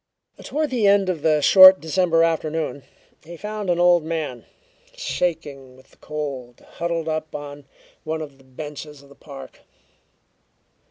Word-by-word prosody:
Toward 305 0 -3
the 230 -5 +1
end 200 -1 +3
of 170 -5 -2
the 155 -1 +2
short 185 +4 +9
December 165 +1 +1
afternoon, 160 -2 -2 0.4
he 170 +2 -11
found 210 0 -5
an 175 -1 +1
old 175 -1 +4
man, 155 -7 -5 0.5
shaking 145 - -4
with 130 - -22
the - - -24
cold, 140 -5 -7
huddled 170 -1 -4
up 155 -1 -4
on 145 -1 -8 0.4
one 160 0 -3
of 140 -3 -12
the - - -20
benches 145 +2 -10
of 140 - -19
the - - -15
park. 140 -3 -12
155 Hz, 150 wpm, -22 LUFS, 145-175 Hz, 0.5 s, short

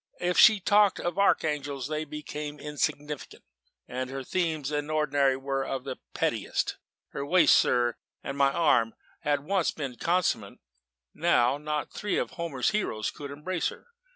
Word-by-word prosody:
If 180 0 0
she 215 -3 +7
talked 205 +1 +4
of 175 +2 -2
archangels, 145 -8 +1
they 155 0 -2
became 150 0 -6
insignificant 150 0 -3 0.4
and 130 +1 -4
her 135 0 -5
themes, 160 -3 -1
in 145 0 -2
ordinary, 145 -3 +2
were 135 0 -2
of 135 -1 -4
the 130 -1 -5 0.2
pettiest. - - -1 0.3
Her 140 - -5
waist, 165 +2 +5
sir, 120 -1 +2 0.3
and 140 - -4
my 140 -1 +3
arm 120 -8 +2 0.2
had 145 -1 0
once 185 +3 +1
been 135 -5 -5
commensurate: 175 +5 0 0.6
now 140 -5 +2
not 150 0 -3
three 205 -2 -2
of - - -1
Homer's 165 -7 -1
heroes 150 - -1
could 145 -1 -8
embrace 160 +5 -2
her. - - -9
150 Hz, 155 wpm, -28 LUFS, 135-170 Hz, 0.6 s, she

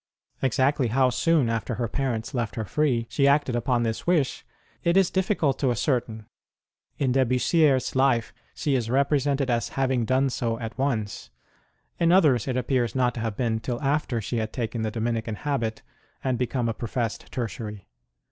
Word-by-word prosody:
Exactly 135 +1 +2
how 130 +2 +3
soon, 160 -2 +2
after 115 +1 -2
her 120 0 -1
parents 115 -3 -2
left 120 -3 -2
her 110 - -3
free, 125 -1 +1
she 140 +4 +2
acted 140 -3 +3
upon 120 0 +1
this 110 +5 -3
wish, 160 -7 +1 0.4
it 170 +2 +3
is 195 -2 +4
difficult 185 -7 +1
to 135 - +1
ascer 125 +1 +1
tain: 110 -2 -10 0.7
in 135 -3 +1
De 135 +1 +3
Bussierre 135 +4 +3
s 130 - -2
life 130 -4 +2 0.2
she 145 - -1
is 120 -4 0
represented 140 0 +1
as 115 -1 0
having 130 -2 +1
done 130 +3 +2
so 115 -2 -1
at 115 0 -6
once; 120 -7 -2 0.7
in 170 0 +4
others 150 - +4
it 130 -1 -1
appears 125 -3 0
not 125 -2 +2
to 120 - -6
have 110 -2 -3
been 115 -3 0
till 120 +1 -3
after 140 -3 0
she 115 +3 -3
had 110 -1 -2
taken 115 -2 -3
the 110 - 0
Domini 115 +1 -1
can 110 -1 -5
habit 120 -5 -2 0.4
and 130 -2 0
become 125 -1 -1
a 115 - 0
professed 115 -1 -4
Tertiary. 105 -4 -5
125 Hz, 185 wpm, -25 LUFS, 115-135 Hz, 0.7 s, is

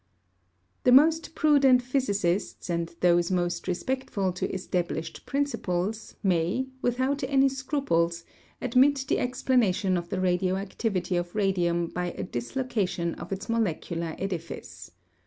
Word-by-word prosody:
The 250 - +5
most 320 +4 +5
prudent 275 -5 +5
physicists 205 -9 -1
and 170 0 -1
those 175 -1 +4
most 175 -2 -1
respectful 195 -1 -1
to 180 - -3
established 175 -3 -3
principles 220 -7 -2
may, 180 +6 +1 0.2
without 260 +4 0
any 270 0 +4
scruples, 260 - -1 0.3
admit 265 +2 +3
the - - +1
explanation 230 -7 +1
of 170 0 -5
the 190 - -2
radioactivity 185 +1 0
of 175 +1 -3
radium 175 -4 +1
by 175 +1 -3
a - - -5
dislocation 180 - -2
of 170 - -9
its 195 0 -4
molecular 170 -7 -1
edifice. 180 -4 -6
190 Hz, 120 wpm, -27 LUFS, 175-255 Hz, 0.3 s, The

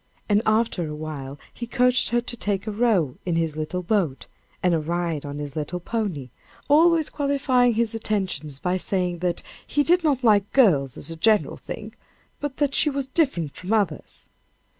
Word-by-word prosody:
And 205 0 +3
after 215 -6 +1
a 150 - -5
while 145 -3 -6 0.2
he 235 - -6
coaxed 250 +1 +3
her 240 0 +2
to 240 - -5
take 205 -3 -1
a 215 - -3
row 205 - +1
in 175 -2 -1
his 165 -2 0
little 155 +4 -3
boat, 175 -8 0 0.4
and 180 -1 +3
a 165 - +2
ride 165 -2 -2
on 145 0 -6
his 145 -1 -6
little 155 +3 -3
pony 175 - -3 0.4
always 320 +2 +4
qualifying 270 -4 +2
his 230 -1 +1
attentions 190 -10 -2
by 180 +5 -1
saying 180 -2 -2
that 175 0 -1 0.2
he 290 - +2
did 350 +3 +3
not 280 -5 +1
like 205 -3 +4
girls 150 - +4
as - - -5
a - - -5
general 215 +6 +2
thing, - - -8 0.5
but 290 -2 -4
that 285 -2 +1
she 305 - +3
was 275 -1 -2
different 260 - 0
from 185 +4 -3
others. 210 -3 -2
200 Hz, 180 wpm, -24 LUFS, 160-245 Hz, 0.5 s, always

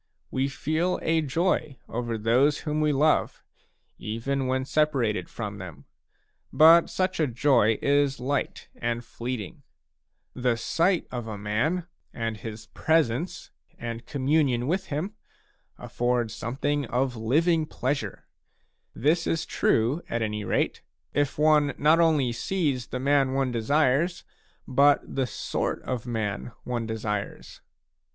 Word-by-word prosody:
We 130 +1 0
feel 155 +6 -1
a 160 0 +2
joy 155 -1 0
over 120 0 -3
i - - -2
those 125 +7 +2
whom 155 0 -1
we 150 0 +3
love, 150 +2 +2 0.6
even 130 +5 -2
when 130 0 0
separated 135 -8 +1
from 105 -3 -6
them, 85 -7 -9 0.7
but 165 +2 +7
such 185 -1 -1
a 155 - +3
joy 120 -3 +3
is 140 -1 +2
light 140 +3 -2
and 120 0 -3
fleeting; 115 -6 -5 0.7
the 125 -2 0
sight 170 - +1
of 120 -2 -5
a 110 -2 -5
man, 115 - -1 0.3
and 115 -2 -3
his 110 0 -8
presence, 155 +4 0 0.3
and 115 0 -6
communion 135 -3 +1
with 180 +7 -1
him, 155 +8 -3 0.6
afford 120 -2 -1
something 140 +6 -2
of 125 +2 0
living 155 +8 +2
pleasure; 130 -8 -3 0.7
this 160 +6 +1
is 165 - 0
true, 120 +9 +1
at 115 -1 -1
any 105 -1 -2
rate, - - 0 0.3
if 145 -1 0
one 150 -1 +3
not 155 +3 +4
only 155 -7 +3
sees 140 -1 -1
the 125 - -4
man 135 0 +2
one 135 -1 0
desires, 145 +8 +1 0.4
but 140 +2 +4
the 135 -2 +1
sort - - -2
of 125 -2 -4
man 110 -1 -3
one 120 -2 -3
desires. 105 -2 -4
130 Hz, 130 wpm, -26 LUFS, 115-150 Hz, 0.7 s, but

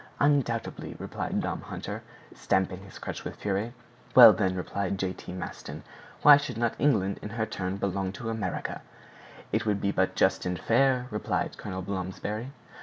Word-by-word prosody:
"Undoubtedly," 140 -6 0
replied - - -3
Tom - - -2
Hunter, - - -6 0.3
stamping 95 0 0
his 95 0 -12
crutch - - -6
with - - -6
fury. 105 +3 -2 0.4
"Well, 115 -4 +11
then," 95 -1 0
replied 100 +1 -2
J. 95 -1 -1
T. - - -10
Maston, 90 -1 -7 0.4
"why 145 -1 +10
should 145 -5 -4
not 115 -1 +1
England 105 -9 +2
in 105 - -6
her 110 +1 -1
turn 95 -3 -3
belong 95 -1 -1
to 100 - -9
the 115 - -2
Americans?" 105 -5 -3 0.7
"It - - 0
would 105 -1 +2
be 100 - 0
but - - +1
just - - +2
and 90 0 -2
fair," 125 +3 +3
returned 105 - -1
Colonel 95 -2 -5
Blomsberry. 100 +6 -4
100 Hz, 170 wpm, -28 LUFS, 95-115 Hz, 0.7 s, Well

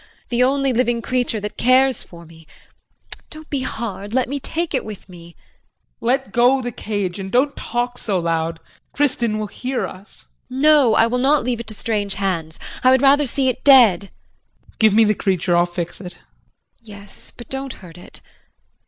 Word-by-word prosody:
The 240 0 0
only 270 +1 +2
living 240 -1 0
creature 245 -3 -1
that 210 0 -6
cares 255 0 +3
for 170 -1 -11
me. 160 -1 -17 0.8
Don't 310 0 -11
be 280 - -1
hard 220 -3 -5
let 260 - +1
me 280 +2 -3
take 330 +4 -3
it 260 - 0
with 210 -4 -9
me. 170 -2 -14
JEAN. - - -38 0.6
Let 245 -1 0
go 245 +4 +3
the 245 -1 -4
cage 205 -4 -4
and 190 0 -6
don't 270 +5 +2
talk 245 +1 -3
so 200 -4 -1
loud. 165 -1 -2 0.4
Kristin 245 -6 0
will 215 - -3
hear 250 +5 -4
us. 190 +3 -12 0.2
JULIE. 255 +1 -6
No, 295 -7 +5
I 225 - +5
will 245 +2 -1
not 280 +2 +3
leave 245 -1 -2
it 235 - -7
to 215 - -5
strange 205 -3 -2
hands. 175 -6 -3 0.3
I 255 - +6
would 260 +1 +4
rather 280 +1 +4
see 265 +2 0
it 255 - -2
dead. 245 -10 +6 0.7
JEAN. - - -25
Give 220 -2 +4
me 225 - +6
the 215 0 +3
creature. 185 -3 0
I'll 175 0 +3
fix 175 +1 -6
it. 180 -2 -8
JULIE. - - -24 0.6
Yes, 205 -3 -14
but 240 - -11
don't 270 0 -5
hurt 170 0 -13
it. - - -14
230 Hz, 195 wpm, -20 LUFS, 195-260 Hz, 0.8 s, I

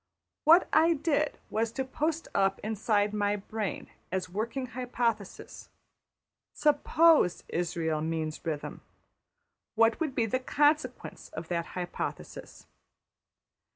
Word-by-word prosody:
What 335 +4 +7
I 325 +2 +5
did 300 0 0
was 225 +1 0
to 265 +2 -2
post 310 +4 -2
up 195 0 +2
inside 210 -1 0
my 205 -1 +1
brain 210 0 -4 0.2
as 185 0 -2
a - - -21
working 230 +7 -3
hypothesis: 245 -2 -3 0.9
``\emph{Suppose} 300 - +4
Israël 165 -3 -1
means 160 -1 -3
rhythm, 155 -3 -4 0.9
what 225 0 +3
would 310 -5 -2
be 230 - +2
the 240 +4 0
consequence 290 -1 0
of 160 0 -7
that 170 -1 -1
hypothesis?'' 175 -1 -6
225 Hz, 115 wpm, -29 LUFS, 180-285 Hz, 0.9 s, What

